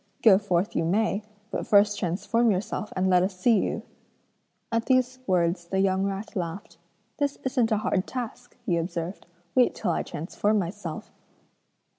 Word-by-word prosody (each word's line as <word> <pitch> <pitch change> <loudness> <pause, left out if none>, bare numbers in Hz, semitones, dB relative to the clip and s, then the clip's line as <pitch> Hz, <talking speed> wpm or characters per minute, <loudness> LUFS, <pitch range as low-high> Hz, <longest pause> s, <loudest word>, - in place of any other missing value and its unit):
Go 195 -4 +7
forth 190 -2 0
you 165 - +1
may, 200 +4 +1 0.3
but - - -3
first 205 0 +4
transform 215 +6 +1
yourself 215 +2 -2
and 185 0 +1
let 180 -1 +5
us 185 0 -1
see 220 +3 +4
you.' - - -2 0.9
At 230 0 0
these 255 -1 +2
words 175 -1 +1
the 190 - -2
young 190 0 +2
rat 200 +2 -4
laughed. 170 -1 -5 0.4
'This 285 -1 0
isn't 250 -3 +1
a 215 - +3
hard 200 -2 0
task!' 245 0 -6
he 175 -7 +1
observed, 170 +2 -4 0.3
'wait 250 -1 +4
till 185 - -1
I - - 0
transform 205 +7 -1
myself.' 175 -3 -4
195 Hz, 160 wpm, -26 LUFS, 180-225 Hz, 0.9 s, Go